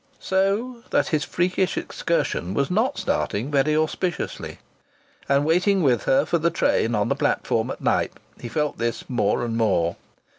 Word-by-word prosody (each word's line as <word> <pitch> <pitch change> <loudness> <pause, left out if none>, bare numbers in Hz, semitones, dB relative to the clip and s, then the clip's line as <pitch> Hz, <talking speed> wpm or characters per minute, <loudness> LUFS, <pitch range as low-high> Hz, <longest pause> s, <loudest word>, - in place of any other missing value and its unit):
So 200 +6 0
that - - +1
his 155 -4 +1
freakish 180 +2 0
excursion 90 +3 -1
was 140 +2 0
not 230 +9 +1
starting 140 - -1
very 145 +2 +2
auspiciously. 155 +2 -2 0.7
And, 140 +1 +3
waiting 180 +4 +3
with 125 -5 +2
her 135 +2 +3
for 170 - +1
the 170 +2 +2
train 115 -7 +1
on 105 -1 +1
the - - +1
platform - - 0
at - - -6
Knype, - - 0 0.2
he 120 - -7
felt 150 +1 -2
this 115 0 -2
more 120 -1 0
and 115 -1 -3
more. 95 -7 +1
150 Hz, 160 wpm, -23 LUFS, 120-185 Hz, 0.7 s, And